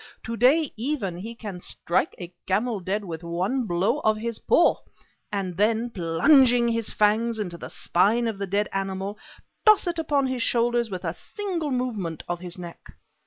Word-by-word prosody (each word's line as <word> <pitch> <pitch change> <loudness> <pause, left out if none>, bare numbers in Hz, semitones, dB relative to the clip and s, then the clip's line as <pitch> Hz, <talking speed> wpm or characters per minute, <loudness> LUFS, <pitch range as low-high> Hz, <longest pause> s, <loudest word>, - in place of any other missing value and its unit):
To 230 - -4
day, 270 +6 +3
even, 225 - -2
he 225 +5 -6
can 205 -6 -7
strike 175 0 -1
a 175 0 -8
camel 210 +3 0
dead 200 +3 -2
with 165 -3 -6
one 185 +10 -1
blow 195 +10 +1
of 215 -6 +2
his 230 0 -4
paw, 340 - +4 0.5
and 195 -3 -2
then, 225 +3 +1
plunging 235 - +4
his 230 -1 -2
fangs 220 +2 +2
into 185 -5 -4
the - - -8
spine 225 +7 +2
of 215 -3 -3
the 200 - -2
dead 205 +2 0
animal, 195 +1 -3 0.4
toss 430 -2 +6
it 345 -1 -2
upon 290 -3 +1
his 260 -2 -2
shoulders 235 0 +1
with 185 -3 -5
a - - -1
single 370 -7 -4
movement 220 - -2
of 175 0 -2
his 180 0 -7
neck. 175 -2 -10
215 Hz, 175 wpm, -25 LUFS, 185-245 Hz, 0.5 s, toss